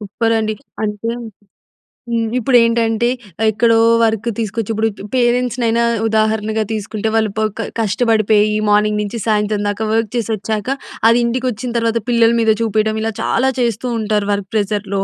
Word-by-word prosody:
Super 225 Hz, +3 st, -1 dB
అండి. 215 Hz, -1 st, -1 dB, 0.3 s
అంటే 210 Hz, +2 st, -3 dB, 1.0 s
హ్మ్. 230 Hz, -1 st, 0 dB
ఇప్పుడు 245 Hz, +1 st, +3 dB
ఏంటంటే 230 Hz, 0 st, +1 dB, 0.3 s
ఆహ్, 220 Hz, -, +3 dB
ఎక్కడో 230 Hz, +1 st, +3 dB, 0.3 s
వర్క్ 225 Hz, 0 st, 0 dB
తీసుకొచ్చి 225 Hz, 0 st, -2 dB
ఇప్పుడు 220 Hz, +1 st, +1 dB, 0.3 s
పేరెంట్స్‌నైనా 240 Hz, -1 st, +1 dB, 0.2 s
ఉదాహరణగా 220 Hz, 0 st, 0 dB
తీసుకుంటే, 215 Hz, +1 st, -3 dB
వాళ్ళు 220 Hz, -2 st, +1 dB
ప -, -, +1 dB, 0.2 s
క 225 Hz, -, -2 dB
కష్టపడిపోయి 215 Hz, -1 st, +2 dB
మార్నింగ్ 210 Hz, 0 st, +2 dB
నుంచి 210 Hz, +3 st, -4 dB
సాయంత్రం 210 Hz, -1 st, +1 dB
దాకా 220 Hz, +2 st, -2 dB
వర్క్ 225 Hz, -2 st, 0 dB
చేసి 230 Hz, -2 st, -1 dB
వచ్చాక, 215 Hz, +6 st, -3 dB, 0.3 s
అది 235 Hz, +1 st, +4 dB
ఇంటికి 245 Hz, +2 st, -1 dB
వచ్చిన 240 Hz, +2 st, -5 dB
తర్వాత 230 Hz, 0 st, 0 dB
పిల్లల 230 Hz, -1 st, +4 dB
మీద 220 Hz, -1 st, +4 dB
చూపియడం 220 Hz, 0 st, 0 dB
ఇలా 225 Hz, 0 st, -2 dB
చాలా 265 Hz, +1 st, +1 dB
చేస్తూ 235 Hz, 0 st, -1 dB
ఉంటారు, 210 Hz, -1 st, -1 dB
వర్క్ 200 Hz, -2 st, -4 dB
ప్రెషర్‌లో 205 Hz, -2 st, -1 dB
220 Hz, 150 wpm, -17 LUFS, 210-230 Hz, 1.0 s, అది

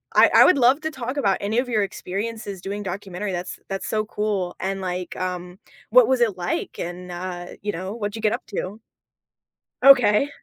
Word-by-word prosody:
I -, -, +7 dB
I -, -, +9 dB
would 360 Hz, -, +5 dB
love 260 Hz, +4 st, +4 dB
to 315 Hz, 0 st, -3 dB
talk 255 Hz, 0 st, -5 dB
about 200 Hz, -9 st, +2 dB
any 210 Hz, +3 st, -1 dB
of 250 Hz, 0 st, -2 dB
your 215 Hz, -3 st, +2 dB
experiences 200 Hz, +1 st, -5 dB
doing 200 Hz, +2 st, -4 dB
documentary. 195 Hz, +1 st, -4 dB
That's 180 Hz, 0 st, -5 dB
that's 195 Hz, 0 st, -4 dB
so 215 Hz, -1 st, 0 dB
cool, 210 Hz, -4 st, -2 dB
and 195 Hz, +1 st, -2 dB
like, 180 Hz, -1 st, -4 dB
um, 180 Hz, 0 st, -4 dB, 0.3 s
what -, -, +7 dB
was 260 Hz, -1 st, +2 dB
it, 220 Hz, -5 st, +2 dB
like, 175 Hz, 0 st, -3 dB
and, 180 Hz, +1 st, -6 dB
uh, 175 Hz, 0 st, -5 dB, 0.2 s
you 205 Hz, +1 st, -2 dB
know, 185 Hz, +3 st, -5 dB
what 210 Hz, -3 st, -3 dB
did -, -, -9 dB
you -, -, -6 dB
get 215 Hz, -, +3 dB
up -, -, -4 dB
to? 200 Hz, +1 st, -5 dB, 1.0 s
Ok. 270 Hz, -1 st, +6 dB
200 Hz, 200 wpm, -23 LUFS, 180-225 Hz, 1.0 s, I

